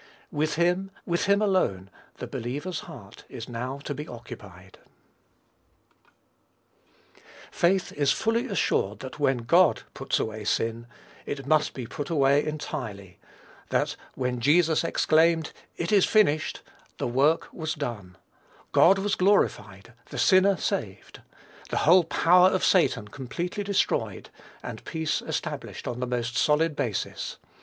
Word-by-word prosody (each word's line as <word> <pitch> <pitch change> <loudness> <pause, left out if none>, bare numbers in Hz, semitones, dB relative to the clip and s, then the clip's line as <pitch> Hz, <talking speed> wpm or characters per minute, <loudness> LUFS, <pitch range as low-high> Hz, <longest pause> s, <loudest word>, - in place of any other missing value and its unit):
With 155 +1 -1
him, 180 +3 +1 0.2
with 170 -1 0
him 200 +1 +3
alone, 100 - 0 0.2
the - - -6
believer's 145 +9 -4
heart - - -12
is - - -8
now 125 +3 -4
to 145 - -4
be 150 +2 -7
occupied. 105 -6 -11 2.7
Faith 185 +2 +1
is 145 -1 +2
fully 230 +3 0
assured 105 - 0
that 130 +2 -8
when 135 -4 +1
God 175 +8 +4
puts - - -1
away 110 -1 -4
sin, 115 +2 -1 0.4
it 140 -2 -5
must 155 +1 +2
be 125 - -5
put 145 +6 -6
away 140 -2 +3
entirely; 100 -11 -6 0.5
that, - - 0 0.2
when 125 -1 -2
Jesus 160 +5 +3
exclaimed, 165 0 +2 0.3
"IT 170 - -2
IS 200 -3 +5
FINISHED," 160 -8 +2 0.4
the - - -2
work 140 +7 +2
was 160 -2 -3
done, 105 - -6 0.5
God 195 +3 +6
was 195 +1 -1
glorified, 115 - +1 0.2
the - - -7
sinner 190 0 +4
saved, - - -4 0.5
the - - -2
whole 175 +2 +6
power 180 +3 +5
of 190 - -1
Satan 135 - +2
completely 170 - -5
destroyed, 200 -1 -1 0.3
and - - -7
peace 160 -2 -2
established - - -5
on 120 0 -4
the 125 - -2
most 120 -1 -2
solid 150 +1 +2
basis. 115 -9 -3
150 Hz, 130 wpm, -26 LUFS, 120-175 Hz, 2.7 s, God